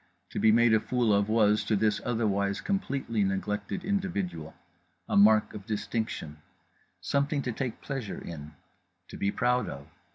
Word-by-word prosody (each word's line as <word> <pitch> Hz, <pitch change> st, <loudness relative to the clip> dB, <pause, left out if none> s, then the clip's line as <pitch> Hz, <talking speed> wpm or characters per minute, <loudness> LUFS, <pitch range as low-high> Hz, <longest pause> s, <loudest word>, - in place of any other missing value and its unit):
To -, -, -3 dB
be 110 Hz, -, +5 dB
made 120 Hz, +1 st, +5 dB
a 110 Hz, -, +5 dB
fool 120 Hz, -2 st, +1 dB
of 100 Hz, +1 st, +2 dB
was, 105 Hz, -1 st, +3 dB
to 110 Hz, -, +1 dB
this 105 Hz, 0 st, +1 dB
otherwise 100 Hz, -4 st, 0 dB
completely 135 Hz, -, -1 dB
neglected 100 Hz, -, -2 dB
individual, 190 Hz, -, -2 dB, 0.5 s
a -, -, -1 dB
mark 105 Hz, +1 st, +5 dB
of 100 Hz, -2 st, -9 dB
distinction; 105 Hz, -7 st, -3 dB, 0.6 s
something 140 Hz, 0 st, 0 dB
to 125 Hz, -, -2 dB
take 120 Hz, +1 st, -4 dB
pleasure 135 Hz, -8 st, -5 dB
in; 75 Hz, -2 st, -9 dB, 0.5 s
to -, -, -8 dB
be 100 Hz, -, 0 dB
proud 125 Hz, +4 st, +1 dB
of. 70 Hz, -, -8 dB
110 Hz, 155 wpm, -28 LUFS, 100-125 Hz, 0.6 s, be